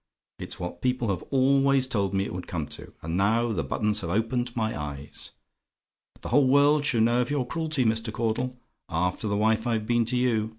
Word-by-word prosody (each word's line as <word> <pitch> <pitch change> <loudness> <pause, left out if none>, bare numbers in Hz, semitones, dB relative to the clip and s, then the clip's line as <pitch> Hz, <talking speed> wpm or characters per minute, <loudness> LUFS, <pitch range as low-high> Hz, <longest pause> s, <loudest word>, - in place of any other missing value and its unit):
It's - - -6
what 90 0 -6
people 125 -3 0
have 95 - -1
always 135 0 +3
told 100 -6 -1
me 95 0 +1
it - - -6
would 90 0 -6
come 80 -4 -3
to, - - -8
and 80 +1 -3
now 115 +5 +2
the 85 -8 -1
buttons 105 +10 0
have 85 - -4
opened 120 +5 -1
my 110 -2 -1
eyes! 75 -1 -6 0.9
But - - -24
the - - -5
whole 145 -2 +4
world 145 +2 +4
shall 115 -5 +2
know 120 +2 +3
of 125 - -2
your 145 -3 0
cruelty, 155 -1 -1
Mr. 110 0 0
Caudle. 125 +3 -2 0.3
After 90 +6 -1
the 100 0 0
wife 110 +2 +2
I've 110 -2 0
been 120 0 +2
to 125 +2 0
you. 115 -3 +1
115 Hz, 210 wpm, -26 LUFS, 100-125 Hz, 0.9 s, whole